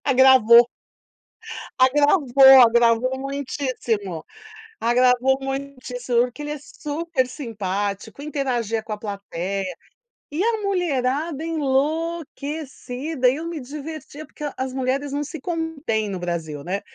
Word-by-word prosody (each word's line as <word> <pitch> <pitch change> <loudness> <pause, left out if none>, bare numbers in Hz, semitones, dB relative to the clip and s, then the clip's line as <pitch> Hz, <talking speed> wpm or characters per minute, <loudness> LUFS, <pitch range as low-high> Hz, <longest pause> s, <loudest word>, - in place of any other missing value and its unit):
Agravou. 255 -3 +7 1.2
Agravou, 270 -1 +6
agravou 235 +2 +4
muitíssimo, 255 - -3 0.6
agravou 250 +2 +3
muitíssimo 270 -3 -3
porque 250 +4 -7
ele 295 - -5
é 300 - -4
super 295 -1 -3
simpático, 205 -3 -4
interagia 250 -7 -2
com 220 - -7
a 210 - -3
plateia. 195 -2 -4 0.6
E 315 +5 0
a 440 -1 0
mulherada 315 -5 -1
enlouquecida, 300 -2 -1
eu 305 +6 -4
me 335 -3 -5
divertia 300 +2 -8
porque 300 - -14
as 260 0 -3
mulheres 270 +2 -1
não 290 +1 -1
se 300 +3 -6
contêm 310 - -2
no 195 -2 -4
Brasil, 165 -5 -4
né. 190 +3 -2
265 Hz, 110 wpm, -22 LUFS, 235-295 Hz, 1.2 s, Agravou